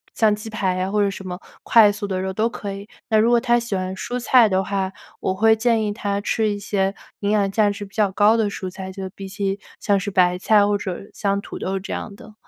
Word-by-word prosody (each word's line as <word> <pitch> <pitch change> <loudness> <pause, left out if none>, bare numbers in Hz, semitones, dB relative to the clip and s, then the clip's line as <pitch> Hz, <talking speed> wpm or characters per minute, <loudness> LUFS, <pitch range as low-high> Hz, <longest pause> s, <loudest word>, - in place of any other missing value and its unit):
像 215 -2 +3
鸡 215 +1 -8
排 195 -4 -1
呀 185 +1 -1
或 210 +1 +1
者 200 - +1
什 190 -1 -8
么 180 0 -5 0.2
快 220 -3 +6
速 205 0 -5
的 190 -2 -2
肉 190 0 -3
都 220 +4 +1
可 200 -3 -6
以。 200 +1 -9 0.2
那 220 - +4
如 225 +2 +4
果 240 0 +5
他 240 0 +2
喜 235 -4 -3
欢 185 0 -3
蔬 245 +6 -4
菜 240 -2 +5
的 190 0 +1
话， 195 -1 -2 0.3
我 190 - -1
会 220 +2 +4
建 225 0 +1
议 210 - -1
他 200 -1 -2
吃 215 +1 0
一 205 - -2
些 195 -1 -1 0.2
营 200 - -1
养 205 -2 +2
价 210 0 +3
值 205 0 -5
比 195 - -18
较 210 -3 +2
高 210 +3 +5
的 220 -3 +1
蔬 190 - -5
菜， 190 +1 -7
就 190 0 -6
比 195 0 -9
起 195 0 -2 0.2
像 200 -2 +2
是 205 +2 -3
白 180 -2 +2
菜 205 +1 +4
或 205 0 +1
者 190 -3 -4
像 200 -1 0
土 - - -8
豆 190 +1 -2
这 190 - -6
样 200 - -5
的 215 +1 -14
200 Hz, 280 characters per minute, -22 LUFS, 190-215 Hz, 0.3 s, 快